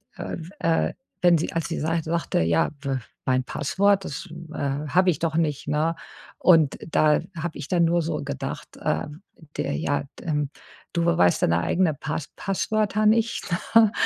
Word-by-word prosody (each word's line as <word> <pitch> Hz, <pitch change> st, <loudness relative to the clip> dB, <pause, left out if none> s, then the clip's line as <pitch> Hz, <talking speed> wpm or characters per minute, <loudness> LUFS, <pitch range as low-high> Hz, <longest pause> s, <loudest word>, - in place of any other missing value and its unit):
äh, -, -, -5 dB, 0.2 s
äh, 165 Hz, 0 st, +1 dB, 0.3 s
wenn 175 Hz, -1 st, +6 dB
sie 160 Hz, -, -3 dB
als 165 Hz, -2 st, -1 dB
sie 165 Hz, -, -3 dB
sag 165 Hz, +1 st, 0 dB
sagte: 165 Hz, +2 st, 0 dB
„Ja, 80 Hz, 0 st, +2 dB
w 135 Hz, -2 st, -1 dB, 0.3 s
mein 130 Hz, 0 st, +2 dB
Passwort. 195 Hz, +9 st, +1 dB
Das, 160 Hz, +6 st, -6 dB, 0.2 s
äh, -, -, -6 dB, 0.3 s
habe 185 Hz, +5 st, +3 dB
ich 150 Hz, -, -4 dB
doch 165 Hz, -2 st, -1 dB
nicht, 155 Hz, -4 st, 0 dB
ne?“ 155 Hz, +3 st, +1 dB, 0.4 s
Und 160 Hz, -6 st, +5 dB
da 155 Hz, -2 st, +4 dB, 0.2 s
habe 165 Hz, 0 st, -4 dB
ich -, -, -6 dB
dann 175 Hz, -2 st, +2 dB
nur 170 Hz, +1 st, +3 dB
so 165 Hz, -2 st, -2 dB
gedacht, 140 Hz, -1 st, -5 dB
äh, 80 Hz, -, 0 dB, 0.5 s
der -, -, -1 dB
ja, 80 Hz, -, 0 dB, 0.2 s
d -, -, -11 dB
ähm. 150 Hz, -3 st, 0 dB, 0.4 s
du 170 Hz, -1 st, +1 dB
weißt 90 Hz, -, +3 dB
deine 85 Hz, +1 st, +3 dB
eigene 170 Hz, -, +2 dB
Pass 150 Hz, +1 st, -4 dB
Passwörter 215 Hz, +2 st, 0 dB
nicht, 225 Hz, +2 st, +3 dB, 0.3 s
ne? 225 Hz, -2 st, +7 dB
165 Hz, 170 wpm, -25 LUFS, 145-180 Hz, 0.5 s, ne